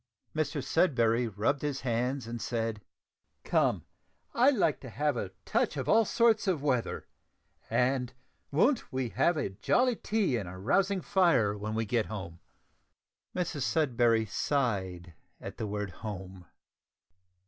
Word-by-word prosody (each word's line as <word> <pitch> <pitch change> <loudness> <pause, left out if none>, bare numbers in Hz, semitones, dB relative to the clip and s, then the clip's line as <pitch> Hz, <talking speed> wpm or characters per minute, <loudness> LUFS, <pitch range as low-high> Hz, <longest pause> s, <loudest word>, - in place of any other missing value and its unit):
Mr 150 -2 -1
Sudberry 120 -8 +2
rubbed 115 +7 0
his 145 -2 -2
hands 125 +1 -1
and 115 0 -6
said, 115 -1 -2 0.6
"Come, - - +1 0.5
I 250 +4 +5
like 200 - +2
to 130 - -9
have 145 +6 0
a 100 -5 -3 0.2
touch - - 0
of - - -3
all 225 0 +5
sorts 225 -1 +3
of 165 -7 0
weather, 130 -5 -1 0.6
and 125 0 +1 0.4
won't 225 - +2
we 130 -2 -2
have 145 +8 +2
a 145 - -1
jolly 245 - +2
tea 205 - 0
and 100 -6 -4
a 90 - -9
rousing 195 - +1
fire 170 - +3
when 105 +1 -4
we 110 0 0
get 115 +1 0
home?" 90 -6 -7 1.0
Mrs 170 -5 -2
Sudberry 120 -7 +2
sighed 95 - -1 0.3
at - - -8
the 110 - -3
word 105 -1 -3
"home." 95 -4 -8
125 Hz, 140 wpm, -30 LUFS, 105-155 Hz, 1.0 s, I